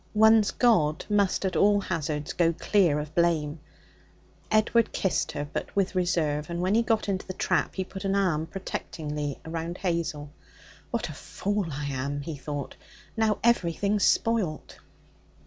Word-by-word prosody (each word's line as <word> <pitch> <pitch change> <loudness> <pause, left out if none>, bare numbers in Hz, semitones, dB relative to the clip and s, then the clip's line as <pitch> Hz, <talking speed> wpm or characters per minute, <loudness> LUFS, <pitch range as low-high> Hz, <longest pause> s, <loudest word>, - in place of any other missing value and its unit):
One's 220 0 +6
god 165 -11 +2
must 200 -1 +2
at 190 - -1
all 205 0 +4
hazards 155 -5 -3
go 170 -1 +2
clear 175 -4 +2
of 150 +1 -5
blame. 165 -3 +1 0.9
Edward 215 +1 +3
kissed 190 - 0
her, 145 0 -3
but - - -4
with 195 -1 +1
reserve, 165 -5 0
and 170 0 -3
when 185 +3 +1
he 230 - +4
got 225 -2 0
into 195 -1 -2
the 185 - -5
trap - - 0
he 190 - -1
put 190 +1 -8
an 195 0 0
arm 170 -6 +1
protectingly 150 -6 -4
round 165 +2 -4
Hazel. 165 -5 -2 0.6
'What - - -2
a - - -6
fool 205 -2 -3
I 145 +1 -4
am!' 140 +1 -3
he 155 +2 -5
thought. 145 -1 -5 0.4
'Now 220 -2 +2
everything's 200 -2 +2
spoilt.' 215 -10 +1
175 Hz, 155 wpm, -27 LUFS, 150-200 Hz, 0.9 s, One's